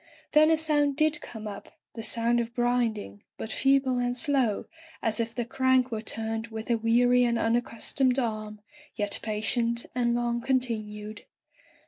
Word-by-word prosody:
Then 310 Hz, +1 st, +6 dB
a 320 Hz, -, +4 dB
sound 295 Hz, -3 st, +2 dB
did 310 Hz, 0 st, +1 dB
come 220 Hz, -2 st, -8 dB
up 200 Hz, -1 st, -9 dB
— -, -, -66 dB
the 225 Hz, -, -6 dB
sound 235 Hz, +1 st, +2 dB
of 235 Hz, 0 st, -4 dB
grinding, 235 Hz, -, -1 dB, 0.2 s
but 220 Hz, -, -6 dB
feeble 270 Hz, -2 st, +2 dB
and 245 Hz, 0 st, -1 dB
slow, 255 Hz, -5 st, +1 dB, 0.3 s
as 225 Hz, -1 st, 0 dB
if 230 Hz, 0 st, -2 dB
the 240 Hz, -, -2 dB
crank 260 Hz, 0 st, +2 dB
were 220 Hz, -1 st, -2 dB
turned 225 Hz, 0 st, -3 dB
with 220 Hz, +1 st, -5 dB
a 235 Hz, -, +3 dB
weary 245 Hz, +2 st, +4 dB
and 235 Hz, -1 st, +1 dB
unaccustomed 240 Hz, +3 st, 0 dB
arm, 215 Hz, -4 st, -3 dB, 0.3 s
yet 205 Hz, -2 st, -1 dB
patient 230 Hz, +2 st, -1 dB
and 240 Hz, -1 st, +1 dB
long 240 Hz, 0 st, -1 dB
continued. 215 Hz, -5 st, -2 dB
235 Hz, 160 wpm, -27 LUFS, 220-255 Hz, 0.3 s, Then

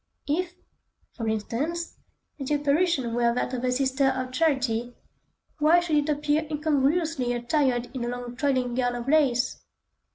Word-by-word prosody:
If, 350 Hz, +4 st, -1 dB, 0.6 s
for 225 Hz, -, -4 dB
instance, 265 Hz, +11 st, -3 dB, 0.4 s
the 275 Hz, +2 st, 0 dB
apparition 290 Hz, -3 st, +1 dB
were 235 Hz, 0 st, +2 dB
that 250 Hz, -, -2 dB
of 250 Hz, -1 st, -3 dB
a 250 Hz, -, +1 dB
Sister 265 Hz, +1 st, +1 dB
of 260 Hz, -1 st, -1 dB
Charity, 255 Hz, -5 st, 0 dB, 0.6 s
why 315 Hz, +4 st, +5 dB
should 340 Hz, -3 st, 0 dB
it 295 Hz, +1 st, +1 dB
appear 300 Hz, +1 st, +1 dB
incongruously 300 Hz, -2 st, +1 dB
attired 245 Hz, 0 st, 0 dB
in 250 Hz, -3 st, -3 dB
a -, -, -2 dB
long 245 Hz, 0 st, -6 dB
trailing 255 Hz, -3 st, 0 dB
gown 245 Hz, 0 st, 0 dB
of 240 Hz, +1 st, -5 dB
lace? 275 Hz, -4 st, +2 dB
265 Hz, 150 wpm, -26 LUFS, 245-300 Hz, 0.6 s, why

